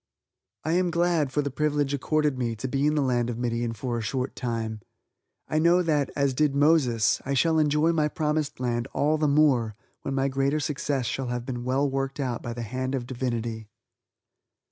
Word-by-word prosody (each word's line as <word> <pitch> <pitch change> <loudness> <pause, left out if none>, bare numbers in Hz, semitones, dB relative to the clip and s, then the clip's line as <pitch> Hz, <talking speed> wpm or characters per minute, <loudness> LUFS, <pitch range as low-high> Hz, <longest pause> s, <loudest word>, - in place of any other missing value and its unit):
I 160 - -1
am 180 +1 +2
glad 170 -4 +1
for 145 +2 0
the 140 - -3
privilege 145 0 0
accorded 150 +1 +1
me 120 -3 -2
to 110 +5 -4
be 140 +2 +1
in 150 - +2
the 150 - +2
land 120 -2 +1
of 115 - -3
Midian 120 -1 -1
for 120 +2 -3
a - - -3
short 130 +4 -3
time! 115 -3 -3 0.7
I 155 - +1
know 170 +3 +4
that, 150 -4 +1
as 140 -2 +1
did 145 +1 +1
Moses, 140 -7 +3
I 140 +1 -1
shall 160 +3 +3
enjoy 150 +2 +3
my 155 -2 +2
promised 150 -3 -1
land 120 -1 -1
all 155 +2 +1
the 150 - +2
more 140 -7 +3 0.3
when 135 - -3
my 135 0 +1
greater 135 +2 0
success 140 -2 -1
shall 130 +4 -2
have 120 0 -3
been 125 -2 -4
well 130 +3 +1
worked 135 +1 -3
out 125 -4 -2
by 120 - -5
the 120 0 -5
hand 130 +4 -3
of 125 -3 -3
Divinity. 120 -3 -3
135 Hz, 200 wpm, -26 LUFS, 120-150 Hz, 0.7 s, know